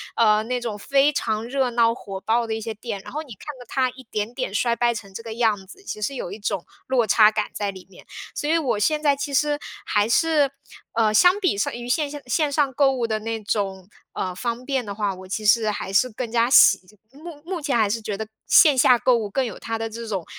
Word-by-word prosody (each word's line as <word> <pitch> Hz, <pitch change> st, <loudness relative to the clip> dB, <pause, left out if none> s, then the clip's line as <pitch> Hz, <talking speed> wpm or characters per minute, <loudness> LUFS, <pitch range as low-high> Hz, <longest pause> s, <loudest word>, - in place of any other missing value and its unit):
呃， 215 Hz, -2 st, +4 dB
那 250 Hz, +2 st, -2 dB
种 225 Hz, -3 st, -4 dB
非 280 Hz, +4 st, +3 dB
常 220 Hz, -5 st, -2 dB
热 260 Hz, +1 st, 0 dB
闹 230 Hz, -1 st, +3 dB
火 195 Hz, -5 st, -8 dB
爆 230 Hz, +2 st, +1 dB
的 220 Hz, -, -2 dB
一 220 Hz, -, -4 dB
些 225 Hz, +1 st, -4 dB
店， 210 Hz, -2 st, -6 dB
然 -, -, -10 dB
后 305 Hz, -, -3 dB
你 265 Hz, -, -11 dB
看 215 Hz, -, -16 dB
着 245 Hz, -, -11 dB
它 260 Hz, -1 st, 0 dB
一 260 Hz, +1 st, -13 dB
点 210 Hz, +2 st, -3 dB
点 255 Hz, -5 st, -4 dB
衰 235 Hz, +2 st, +1 dB
败 235 Hz, 0 st, +1 dB
成 200 Hz, -3 st, -9 dB
这 210 Hz, -, -6 dB
个 225 Hz, -1 st, -7 dB
样 220 Hz, -5 st, 0 dB
子， 390 Hz, -, -15 dB
其 215 Hz, -, -6 dB
实 275 Hz, +7 st, -2 dB
有 195 Hz, -, -5 dB
一 205 Hz, -, -8 dB
种 195 Hz, -4 st, -3 dB, 0.2 s
落 255 Hz, -3 st, +2 dB
差 215 Hz, +1 st, +6 dB
感 215 Hz, -1 st, -2 dB
在 205 Hz, -1 st, -2 dB
里 190 Hz, -1 st, -12 dB
面。 -, -, -16 dB, 0.3 s
所 295 Hz, -, -3 dB
以 330 Hz, -, +3 dB
我 260 Hz, -10 st, 0 dB
现 305 Hz, +7 st, +1 dB
在 285 Hz, -, +4 dB
其 280 Hz, +1 st, -4 dB
实， 295 Hz, +1 st, +1 dB, 0.3 s
还 205 Hz, 0 st, +1 dB
是， 295 Hz, +2 st, +3 dB, 0.4 s
呃， 220 Hz, -2 st, +2 dB
相 360 Hz, -, +5 dB
比 355 Hz, -, +1 dB
上 205 Hz, -, -1 dB
于 240 Hz, 0 st, -7 dB
线 290 Hz, +3 st, +1 dB
下 290 Hz, -, -7 dB
线 290 Hz, +4 st, +1 dB
上 285 Hz, -1 st, +1 dB
购 275 Hz, +1 st, +4 dB
物 245 Hz, -3 st, -1 dB
的 220 Hz, -1 st, -1 dB
那 225 Hz, 0 st, -4 dB
种， 195 Hz, -2 st, -3 dB, 0.2 s
呃， 185 Hz, -, -3 dB
方 235 Hz, +5 st, -4 dB
便 265 Hz, -4 st, -1 dB
的 200 Hz, -, -6 dB
话， 205 Hz, -2 st, -1 dB
我 185 Hz, 0 st, -11 dB
其 215 Hz, +3 st, -4 dB
实 220 Hz, 0 st, +4 dB
还 200 Hz, -2 st, -4 dB
是 250 Hz, +6 st, +3 dB
更 230 Hz, +1 st, -6 dB
加 235 Hz, +1 st, +2 dB
喜 195 Hz, -8 st, +7 dB, 0.3 s
目 300 Hz, +1 st, -11 dB
目 355 Hz, 0 st, -4 dB
前 285 Hz, -5 st, 0 dB
还 215 Hz, -3 st, +2 dB
是 225 Hz, +3 st, -1 dB
觉 210 Hz, -2 st, -4 dB
得， 220 Hz, -, -4 dB, 0.2 s
线 295 Hz, -4 st, +6 dB
下 250 Hz, -1 st, +6 dB
购 245 Hz, 0 st, +3 dB
物 210 Hz, -3 st, -3 dB
更 265 Hz, +6 st, 0 dB
有 225 Hz, -, -6 dB
它 225 Hz, 0 st, -4 dB
的 225 Hz, 0 st, -4 dB
这 230 Hz, +1 st, -7 dB
种， 195 Hz, -6 st, -3 dB
230 Hz, 275 characters per minute, -23 LUFS, 210-270 Hz, 0.4 s, 喜